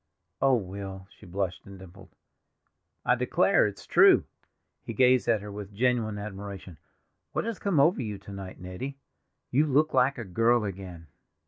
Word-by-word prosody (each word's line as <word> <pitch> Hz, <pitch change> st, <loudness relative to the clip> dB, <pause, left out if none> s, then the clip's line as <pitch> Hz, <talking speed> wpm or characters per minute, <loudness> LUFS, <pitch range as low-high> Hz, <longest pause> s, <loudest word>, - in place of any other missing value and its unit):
"Oh, 135 Hz, -1 st, +5 dB
Will!" 95 Hz, -2 st, -6 dB
She 105 Hz, -, -15 dB
blushed 90 Hz, 0 st, -3 dB
and 100 Hz, 0 st, -10 dB
dimpled. 95 Hz, +1 st, -14 dB, 1.0 s
"I -, -, +4 dB
declare, -, -, +3 dB
it -, -, -6 dB
is -, -, -13 dB
true!" -, -, +6 dB, 0.6 s
He -, -, -6 dB
gazed 125 Hz, -1 st, +4 dB
at 110 Hz, -4 st, +2 dB
her 105 Hz, -, -7 dB
with 100 Hz, 0 st, -8 dB
genuine 115 Hz, -2 st, +1 dB
admiration. 100 Hz, -4 st, -8 dB, 0.5 s
"What -, -, -1 dB
has 230 Hz, -3 st, -4 dB
come 195 Hz, -7 st, +1 dB
over 150 Hz, +1 st, +4 dB
you 105 Hz, -4 st, -4 dB
to 100 Hz, +1 st, -12 dB
night, 95 Hz, -1 st, -8 dB
Nettie?—you 130 Hz, -, -4 dB
look 150 Hz, +3 st, +2 dB
like 135 Hz, +2 st, +3 dB
a 115 Hz, -, -5 dB
girl 115 Hz, +5 st, +2 dB
again." 90 Hz, -4 st, -7 dB
105 Hz, 160 wpm, -28 LUFS, 95-125 Hz, 1.0 s, true